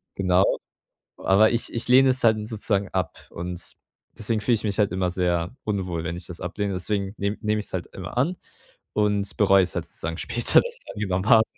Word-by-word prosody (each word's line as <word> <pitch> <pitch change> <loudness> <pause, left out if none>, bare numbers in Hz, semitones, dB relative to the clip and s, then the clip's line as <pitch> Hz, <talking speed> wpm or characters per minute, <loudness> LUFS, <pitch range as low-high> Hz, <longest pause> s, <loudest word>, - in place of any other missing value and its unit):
Genau, 95 0 +2 0.6
aber 100 +4 +4
ich 115 - -1
ich 115 +1 -2
lehne 130 +1 +6
es 130 0 +2
dann 110 -2 +3
sozusagen 100 -3 -1
ab 90 -4 -3
und 90 0 -6 0.4
deswegen 110 0 -1
fühle 120 - +2
ich 105 - -3
mich 105 0 -1
halt 100 -4 +3
immer 90 -1 0
sehr 90 +3 -1
unwohl, 95 -6 -2
wenn 85 0 -3
ich 90 - -8
das 90 -1 -8
ablehne. 100 +2 -3
Deswegen 100 +2 -2
nehm 100 +1 -2
nehme 105 -1 0
ich 105 - -4
es - - -10
halt 90 - -3
immer 95 +5 -8
an 165 +8 +1 0.6
und 105 -1 0
bereue 95 -3 +5
es 90 - -4
halt - - -2
sozusagen 80 +1 -6
später, 120 +5 +5
dass 485 -1 -6
ich - - -6
es - - -9
angenommen 95 +1 -1
habe. 110 -2 +7
100 Hz, 215 wpm, -24 LUFS, 90-110 Hz, 0.6 s, habe